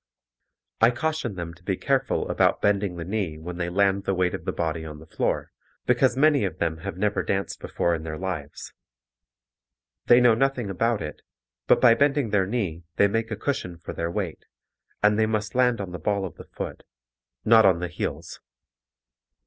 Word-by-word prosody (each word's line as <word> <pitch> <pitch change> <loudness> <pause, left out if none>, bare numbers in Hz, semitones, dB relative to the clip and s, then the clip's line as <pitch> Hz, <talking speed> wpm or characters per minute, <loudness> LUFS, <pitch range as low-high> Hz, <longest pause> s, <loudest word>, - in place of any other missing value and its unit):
I 115 - +7
caution 125 -3 -2
them 85 -2 -5
to 85 +2 -20
be 95 0 -1
careful 135 -1 0
about - - +2
bending 100 -2 +1
the 85 -1 -6
knee 95 -5 -2
when 85 +2 -7
they 85 -1 -2
land 100 +1 +1
the 95 - 0
weight 90 0 +1
of - - -6
the - - 0
body 80 -1 -2
on 75 -1 -8
the 80 - -13
floor, - - -2 0.3
because - - +3
many 145 -2 +4
of 95 -5 -2
them 80 -1 -1
have 95 +3 -6
never 105 +2 +1
danced 95 0 -2
before 85 - -1
in 80 - -2
their 80 -1 -5
lives. 85 -6 -6 1.3
They 120 - +7
know 125 -2 +6
nothing 125 -3 0
about 115 +3 0
it, 75 - -7 0.5
but - - +5
by 120 -3 +7
bending 140 -2 +1
their 95 -3 +2
knee 95 -7 -2
they 100 - +5
make 115 +2 -1
a 105 - -2
cushion 100 -7 -3
for 85 - -8
their 85 0 -2
weight, 85 -2 -4 0.6
and 105 +1 +4
they 110 - +3
must 110 -1 -2
land 125 -2 +3
on 95 -3 -5
the 90 - -6
ball 100 +4 0
of 90 - -7
the - - -12
foot, - - -7 0.6
not 110 0 +7
on 95 -4 +5
the 90 +1 -3
heels. 85 - -5
100 Hz, 195 wpm, -25 LUFS, 85-115 Hz, 1.3 s, I